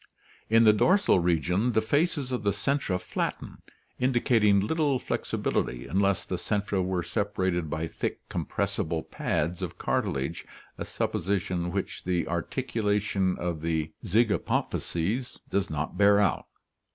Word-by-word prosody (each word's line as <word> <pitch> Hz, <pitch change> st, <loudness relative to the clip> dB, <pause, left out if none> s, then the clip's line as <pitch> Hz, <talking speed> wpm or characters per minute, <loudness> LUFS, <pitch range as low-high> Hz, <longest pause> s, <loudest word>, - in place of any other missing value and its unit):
In 115 Hz, +1 st, +6 dB
the 110 Hz, -1 st, +7 dB
dorsal 185 Hz, -, +4 dB
region 90 Hz, +7 st, +1 dB
the 110 Hz, -, +4 dB
faces 145 Hz, +3 st, 0 dB
of 125 Hz, -, -1 dB
the 100 Hz, -, +1 dB
centra 120 Hz, -4 st, 0 dB
flatten, -, -, -4 dB, 0.4 s
indicating 120 Hz, -5 st, +3 dB
little 145 Hz, +6 st, +1 dB
flexibility 60 Hz, -, -2 dB
unless 95 Hz, +6 st, +1 dB
the 90 Hz, -, -3 dB
centra 100 Hz, 0 st, -1 dB
were 90 Hz, -1 st, -1 dB
separated 90 Hz, -2 st, -1 dB
by 80 Hz, +2 st, -2 dB
thick -, -, -4 dB
compres -, -, -2 dB
sible 80 Hz, 0 st, -3 dB
pads 85 Hz, +4 st, -1 dB
of 90 Hz, -2 st, -4 dB
cartilage, 85 Hz, -, -1 dB, 0.4 s
a -, -, -3 dB
supposition 90 Hz, -1 st, -1 dB
which 100 Hz, 0 st, -3 dB
the 90 Hz, -2 st, 0 dB
articulation 105 Hz, 0 st, 0 dB
of 85 Hz, -3 st, -3 dB
the 80 Hz, -1 st, -1 dB
zygapophyses 110 Hz, 0 st, 0 dB
does 100 Hz, -1 st, 0 dB
not 80 Hz, +3 st, -3 dB
bear 100 Hz, 0 st, +6 dB
out. 100 Hz, -4 st, +1 dB
100 Hz, 130 wpm, -28 LUFS, 85-110 Hz, 0.4 s, the